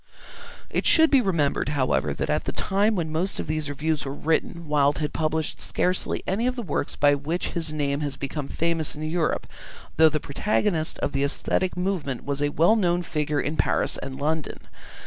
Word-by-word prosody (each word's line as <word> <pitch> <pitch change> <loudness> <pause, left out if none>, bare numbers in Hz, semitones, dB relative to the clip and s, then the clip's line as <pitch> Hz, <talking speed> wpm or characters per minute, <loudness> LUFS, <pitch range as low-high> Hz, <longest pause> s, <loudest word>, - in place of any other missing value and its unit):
It - - 0
should 320 -1 +5
be 275 -3 +6
remembered, 165 - +1
however, 130 - +1
that - - -2
at - - 0
the - - -1
time 205 +3 +1
when 165 -4 -2
most 175 +5 -1
of - - -2
these 155 -1 -2
reviews 150 +2 -1
were 135 - -4
written 165 +2 -1
Wilde 145 -1 +3
had 150 -1 -2
published 155 0 -1
scarcely 180 0 0
any 215 +6 0
of 255 - -1
the 240 - -4
works 145 -5 -2
by 145 0 +4
which 150 +5 -2
his 165 -3 -2
name 140 -2 -1
has 145 -2 -3
become 140 +1 -4
famous 165 -1 0
in 150 - -6
Europe, 160 +1 0 0.5
though 160 +1 +7
the 155 0 -1
protagonist 165 +2 0
of - - 0
the 135 0 0
aesthetic 180 +6 0
movement 180 -9 -2
was 140 0 -2
a 145 - +2
well 165 +9 +4
known 175 -4 +1
figure 150 -3 -1
in 150 +2 -2
Paris - - +1
and 130 0 -6
London. 155 +1 -2
155 Hz, 195 wpm, -25 LUFS, 145-175 Hz, 0.5 s, though